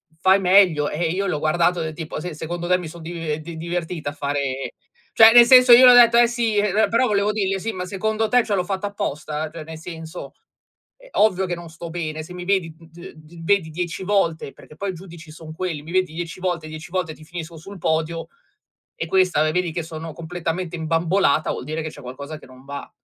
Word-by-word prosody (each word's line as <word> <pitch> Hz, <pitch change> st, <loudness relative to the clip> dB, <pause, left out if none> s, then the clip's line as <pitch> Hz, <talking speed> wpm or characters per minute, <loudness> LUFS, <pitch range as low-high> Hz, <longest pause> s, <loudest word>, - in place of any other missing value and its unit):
f-fai 190 Hz, +3 st, +4 dB
meglio". 180 Hz, -6 st, +4 dB
E 165 Hz, +1 st, -1 dB
io 195 Hz, +3 st, -1 dB
l'ho 155 Hz, -5 st, -1 dB
guardato 170 Hz, +3 st, +1 dB
del 160 Hz, -1 st, -4 dB
tipo: 160 Hz, -2 st, -6 dB
"Sì, 180 Hz, -2 st, -5 dB
secondo 170 Hz, +3 st, -5 dB
te 180 Hz, -, +3 dB
mi 180 Hz, -3 st, -7 dB
son 170 Hz, +1 st, -11 dB
dive 165 Hz, -2 st, -4 dB
di 160 Hz, +1 st, -9 dB
divertita 170 Hz, -2 st, -4 dB
a -, -, -12 dB
fare" 140 Hz, -2 st, -3 dB, 0.5 s
cioè, 225 Hz, 0 st, +10 dB
nel 240 Hz, 0 st, +9 dB
senso, 250 Hz, 0 st, +7 dB
io 255 Hz, +2 st, +9 dB
le 250 Hz, -, +10 dB
ho -, -, +7 dB
detto: 235 Hz, -1 st, +7 dB
"Eh 240 Hz, -, +6 dB
sì", 235 Hz, -3 st, -1 dB
ehm, 210 Hz, +1 st, +2 dB
però 240 Hz, +2 st, +2 dB
volevo 205 Hz, 0 st, +1 dB
dirgli 195 Hz, -2 st, -1 dB
"Sì, 225 Hz, +4 st, -3 dB
ma 180 Hz, -1 st, -5 dB
secondo 220 Hz, +4 st, -1 dB
te 245 Hz, -1 st, +4 dB
cioè 205 Hz, -, 0 dB
l'ho 180 Hz, -, +1 dB
fatto 195 Hz, +1 st, -3 dB
apposta?" 155 Hz, -6 st, -4 dB
Cioè 165 Hz, -, -7 dB
nel 160 Hz, 0 st, -9 dB
senso, 160 Hz, -1 st, -8 dB, 0.7 s
ehm, -, -, -18 dB
ovvio 190 Hz, -3 st, +3 dB
che 175 Hz, -, -3 dB
non 170 Hz, -1 st, -10 dB
sto 165 Hz, +1 st, -9 dB
bene, 155 Hz, -2 st, -4 dB
se 180 Hz, -, -11 dB
mi 180 Hz, 0 st, -7 dB
vedi 185 Hz, -5 st, 0 dB
d 165 Hz, +1 st, -13 dB
d 160 Hz, +2 st, -14 dB
vedi 185 Hz, -3 st, +1 dB
10 175 Hz, +2 st, -4 dB
volte, 175 Hz, -7 st, 0 dB
perché 150 Hz, -, -16 dB
poi 200 Hz, +2 st, -3 dB
i -, -, -10 dB
giudici 170 Hz, -3 st, -12 dB
son 155 Hz, 0 st, -11 dB
quelli, 165 Hz, -3 st, -4 dB
mi 160 Hz, -, -10 dB
vedi 185 Hz, -4 st, +1 dB
dieci 170 Hz, +2 st, -6 dB
volte, 175 Hz, -4 st, -2 dB
dieci 155 Hz, +2 st, -9 dB
volte 180 Hz, -4 st, -2 dB
ti 155 Hz, -, -16 dB
finisco 165 Hz, 0 st, -8 dB
sul 195 Hz, +6 st, -11 dB
podio 160 Hz, +1 st, -1 dB, 0.7 s
e -, -, -4 dB
questa 180 Hz, -4 st, +2 dB
vedi 180 Hz, -1 st, -1 dB
che 170 Hz, -, -3 dB
sono 160 Hz, 0 st, -8 dB
completamente 170 Hz, +1 st, -4 dB
imbambolata, 165 Hz, 0 st, +1 dB
vuol -, -, -5 dB
dire 155 Hz, +2 st, -3 dB
che 155 Hz, -, -4 dB
c'è -, -, -13 dB
qualcosa 140 Hz, +5 st, -8 dB
che -, -, -15 dB
non 130 Hz, 0 st, -16 dB
va. 140 Hz, 0 st, -7 dB
170 Hz, 225 wpm, -22 LUFS, 160-190 Hz, 0.7 s, cioè